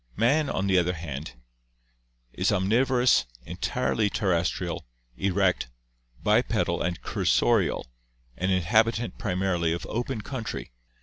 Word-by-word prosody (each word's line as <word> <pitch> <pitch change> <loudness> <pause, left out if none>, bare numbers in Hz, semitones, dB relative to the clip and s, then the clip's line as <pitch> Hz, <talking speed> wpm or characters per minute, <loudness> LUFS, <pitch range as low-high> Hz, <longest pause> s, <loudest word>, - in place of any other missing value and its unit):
Man, 140 +7 +2
on 95 - -1
the 95 -2 +4
other 90 +1 0
hand, 75 -5 -6 1.0
is - - +1
omnivo 110 +8 +2
rous, 120 - +4 0.2
entirely 105 +5 0
terrestrial, 90 - -1 0.3
erect, 95 -3 +1 0.5
bipedal 105 -5 +2
and 85 -2 -1
cursorial, - - +2 0.5
an 95 +6 -1
inhabitant 110 +6 +2
primarily 90 -5 0
of 85 - -4
open 120 0 -3
country. 115 - -5
95 Hz, 110 wpm, -26 LUFS, 85-115 Hz, 1.0 s, the